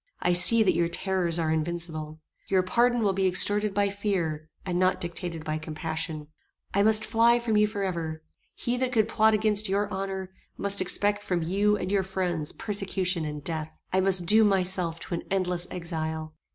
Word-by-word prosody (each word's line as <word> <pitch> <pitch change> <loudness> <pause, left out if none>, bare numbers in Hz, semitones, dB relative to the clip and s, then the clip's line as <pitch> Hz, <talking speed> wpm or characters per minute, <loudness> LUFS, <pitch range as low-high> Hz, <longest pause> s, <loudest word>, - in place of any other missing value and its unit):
I 180 - +1
see 220 +6 +9
that 195 - +2
your 170 0 +1
terrors 175 -1 -1
are 160 -2 -1
invincible. 160 -1 -4 0.3
Your 190 -1 +2
pardon 240 +5 +1
will 200 -2 +1
be 190 0 +1
extorted 205 +3 +3
by 200 0 0
fear, 170 -7 -3 0.2
and 180 -2 -2
not 185 0 +1
dictated 170 -1 -5
by 155 0 -3
compassion. 155 -1 -5 0.5
I 200 - +2
must 220 +1 +5
fly 235 +1 +3
from 235 -2 -2
you 210 0 +4
forever. 170 -6 -4 0.3
He 245 +1 -2
that 255 0 -1
could 220 -4 +2
plot 220 -1 +3
against 215 -1 0
your 200 +2 0
honor, 190 -1 -5 0.3
must 200 -1 0
expect 205 +2 +1
from 180 -4 -2
you 205 +5 +1
and 185 -1 -4
your 200 -1 +2
friends 180 -5 -3
persecution 190 -4 -1
and 150 -1 -6
death. 160 -1 -5 0.2
I 190 - +3
must 190 -2 +1
doom 215 +4 +5
myself 180 -3 +1
to 170 -2 -5
endless 180 -2 -1
exile." 160 -2 -5
185 Hz, 180 wpm, -26 LUFS, 165-205 Hz, 0.5 s, see